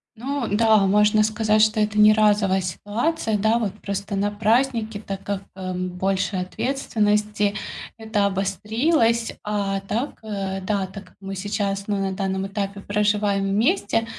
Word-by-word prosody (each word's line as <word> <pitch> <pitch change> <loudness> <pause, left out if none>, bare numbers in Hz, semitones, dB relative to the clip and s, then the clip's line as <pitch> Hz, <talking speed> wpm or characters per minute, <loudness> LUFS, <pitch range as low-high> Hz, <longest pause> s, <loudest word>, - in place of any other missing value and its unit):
Ну 265 +2 -3
да, 220 +1 +4
можно 210 +2 +4
сказать, 215 0 +2
что 215 0 +2
это 210 0 0
не 210 0 +8
разовая 205 -3 +3
ситуация, 215 - -1
да. 220 +3 +2
Вот 210 -5 -2
просто 200 +1 -4
на 205 +1 +1
праздники, 225 0 +1
так 195 -2 -6
как, 200 -1 -3
эм, 185 -1 -3
больше 190 +2 -1
ответственности, 210 -1 0 0.4
это 220 -2 0
обострилось. 225 - +1
А 200 -2 -1
так, 220 +8 -3
э, 195 -3 -3
да, 195 0 -1
так 195 0 -10
как - - -22
мы 195 0 -6
сейчас 200 0 -2
на 195 -2 -1
данном 190 0 -2
этапе 200 0 -4
проживаем 205 -1 +1
вместе, 225 - +1
205 Hz, 145 wpm, -23 LUFS, 195-220 Hz, 0.4 s, не